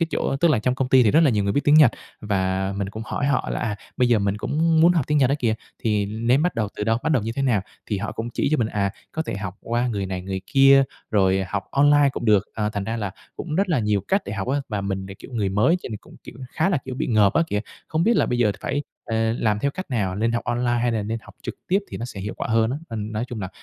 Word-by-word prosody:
cái 165 - +2
chỗ - - -1
tức 170 +4 +3
là 135 - +3
trong 125 +4 0
công 135 -1 -1
ty 130 0 +6
thì 110 - +4
rất 160 - +5
là 155 -4 +5
nhiều 105 -4 +1
người 100 - +1
biết 145 - +2
tiếng 145 - +5
Nhật 150 -6 +8 0.3
và 95 -2 -1
mình 100 -1 -2
cũng 110 +3 -7
hỏi 140 - -2
họ 140 - +1
là, - - -2
à, 105 -2 -2 0.2
bây 125 -2 +3
giờ 120 -3 +4
mình 100 0 0
cũng 160 +7 +1
muốn 170 +2 +6
học 165 -7 0
tiếng 150 0 +2
Nhật 130 -2 +3
á 140 - +3
kìa, 115 -5 +1 0.3
thì 105 -3 +1
nên 115 +6 +1
bắt 180 +1 0
đầu 110 -4 -1
từ 105 - -2
đâu? 115 +1 +1
Bắt 160 - +1
đầu 130 - +2
như 115 +2 -3
thế 135 - -2
nào? 120 -7 +2 0.3
Thì 105 - -2
họ 110 +3 -4
cũng 115 +1 -4
chỉ - - 0
cho 155 - +3
mình, 115 - +1
à, 100 -2 0 0.2
có 160 - -2
thể 155 - -4
học 95 -1 -5
qua 120 +1 -1
người 100 -4 -2
này 95 -1 -4
người 95 0 -4
kia, 135 0 +6 0.3
rồi 95 -2 +3
học 100 0 -3
online 145 0 +5
cũng - - -5
được, 105 -3 +4
à, 105 -1 -1
thành 100 -2 -3
ra 115 +2 -3
là 105 -3 -3 0.3
cũng 160 -4 -5
rất 195 +3 +1
là 165 - +2
nhiều 105 -3 +1
cách 195 +1 +2
để - - -4
học 100 0 -4
á. 140 +2 +1
Và 105 -3 -2
mình 95 -1 -3
thì, 95 - -8
kiểu, 100 - -13
người 105 -4 0
mới 105 - +3
cho 180 - -13
nên - - -6
mình 105 - -5
cũng, - - -16
kiểu, - - -10 0.2
khá 160 +4 +1
là, 180 - +1
kiểu, 130 - -5
bị - - -2
ngợp 105 -4 +4
á 165 - +4
kìa, 105 - 0 0.3
không 160 +1 0
biết 230 +3 +3
là - - +3
bây 120 - -1
giờ 110 -4 +3
phải, 145 +1 -2 0.2
à, 110 0 0
làm 105 -2 +1
theo 140 +6 0
cách 185 0 -7
nào, 100 -7 -1
nên 115 +3 +1
học 115 - -2
online 120 0 0
hay 120 -1 +1
là 110 -2 -1
nên 115 +3 -3
học - - -15
trực - - -5
tiếp 190 - +3
thì - - -5
nó 115 - -5
sẽ 115 -5 -7
hiệu 105 +3 -5
quả - - -4
hơn 115 0 +2
á. 130 - -2
Nên 110 -1 -4
nói 110 +3 -2
chung 115 -4 -5
là 95 - -4
115 Hz, 315 wpm, -23 LUFS, 105-135 Hz, 0.3 s, Nhật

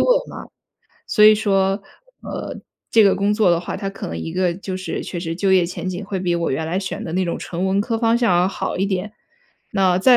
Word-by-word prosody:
位 - - +3 0.2
嘛。 - - -8 0.6
所 210 -2 +4
以 215 - +10
说， 195 -2 +1 0.4
呃， - - -6 0.3
这 225 -2 +6
个 195 - +5
工 200 +1 +1
作 210 -4 +3
的 170 - +1
话， 175 - -5
它 195 - -3
可 195 - -6
能 80 - -5
一 160 - -5
个 180 -1 +1
就 185 +1 -5
是 185 0 -4
确 175 - -5
实 165 -1 -3
就 190 0 +2
业 185 -2 +5
前 180 +1 -4
景 185 +2 -4
会 195 -1 -3
比 180 -2 0
我 170 -1 -1
原 145 +4 -1
来 170 +3 -2
选 190 - -4
的 160 - -5
那 185 +1 +1
种 170 - -2
纯 175 +1 -4
文 190 +1 +2
科 225 +2 -1
方 230 0 +2
向 210 -8 +3
要 180 - +2
好 - - -3
一 190 - +1
点。 200 +1 -2 0.6
那 190 -3 +3
再 250 +5 +6
190 Hz, 265 characters per minute, -21 LUFS, 180-205 Hz, 0.6 s, 以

